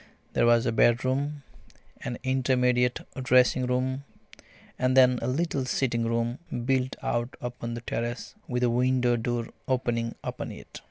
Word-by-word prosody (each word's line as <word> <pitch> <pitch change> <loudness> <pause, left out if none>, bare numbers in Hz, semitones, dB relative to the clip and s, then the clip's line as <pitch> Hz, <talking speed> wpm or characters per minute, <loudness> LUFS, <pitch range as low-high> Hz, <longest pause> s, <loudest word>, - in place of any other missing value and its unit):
There - - +3
was 120 0 +4
a 115 - +2
bedroom, 130 +5 +1 0.6
an 120 - -3
intermediate 125 -1 +2 0.2
dressing 125 0 +4
room, 130 +2 -1 0.8
and 130 +1 +2
then 125 -1 +6
a 115 - -2
little 140 +1 0
sitting 120 -3 0
room 115 +2 -1 0.3
built 130 0 +1
out 120 +3 -2
upon 120 -1 -5
the 120 - -6
terrace, 120 +1 -4
with 125 -1 -1
a 120 - +4
window 125 0 +2
door 120 0 -2 0.2
opening 120 -3 -1
upon - - -5
it. - - -11
125 Hz, 145 wpm, -27 LUFS, 120-130 Hz, 0.8 s, then